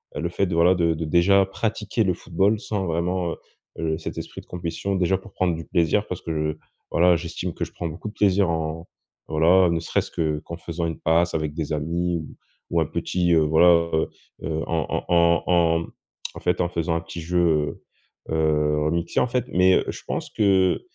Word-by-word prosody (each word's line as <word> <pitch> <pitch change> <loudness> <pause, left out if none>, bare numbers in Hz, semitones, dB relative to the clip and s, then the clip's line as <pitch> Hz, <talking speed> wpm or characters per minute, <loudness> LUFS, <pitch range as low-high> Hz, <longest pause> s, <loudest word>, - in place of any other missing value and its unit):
heu, - - -3
le 85 - -1
fait 100 +3 0
de 90 -2 -2
voilà, 85 +2 +5
de 85 -2 +2
de 80 +1 -4
déjà 90 +5 +4
pratiquer 105 +2 -2
le 90 - +2
football 95 +5 +1
sans 100 -4 -3
vraiment, 85 +1 -1
heu - - -4 0.4
heu, 80 -1 -1
cet 80 - -7
esprit - - -7
de - - -23
compétition. 90 +3 -3
Déjà 95 0 +2
pour 100 +2 -15
prendre 90 -2 0
du 80 - -7
plaisir 90 +3 +1
parce 90 - -4
que, 75 -1 -2 0.3
voilà, 90 +1 +4
j'estime 85 +1 -5
que - - -4
je - - -13
prends 85 - -4
beaucoup 85 +7 -7
de - - -13
plaisir 100 -3 +2
en 80 0 -3 0.4
voilà. 85 +4 +4
Ne 85 0 0
serait-ce - - -1
que, 75 -2 -1
qu'en 85 - -8
faisant 85 0 -4
une 80 - -4
passe 85 +2 +2
avec 75 -2 -2
des 75 -1 -3
amis 85 +4 -1
ou 80 - -9 0.3
ou 85 - +1
un 80 - +2
petit, 85 +2 0
heu, 80 - +5
voilà, 85 +2 +4
heu 80 - +2 0.4
heu, 80 +1 -2
en 80 -3 0
en - - -1
en 85 -1 +4
en 85 -2 +3 0.5
en - - -8
fait 90 0 0
en 85 - 0
faisant 85 -1 -1
un 85 - -1
petit 85 +1 -8
jeu, 85 +1 +1 0.8
heu - - -2
heu, 75 -1 +1
remixé 85 +2 0
en - - +2
fait. 125 -1 -1
Mais 90 +1 +4
heu, - - +1
je - - -6
pense - - -3
que, 95 -3 +2
85 Hz, 215 wpm, -24 LUFS, 80-90 Hz, 0.8 s, voilà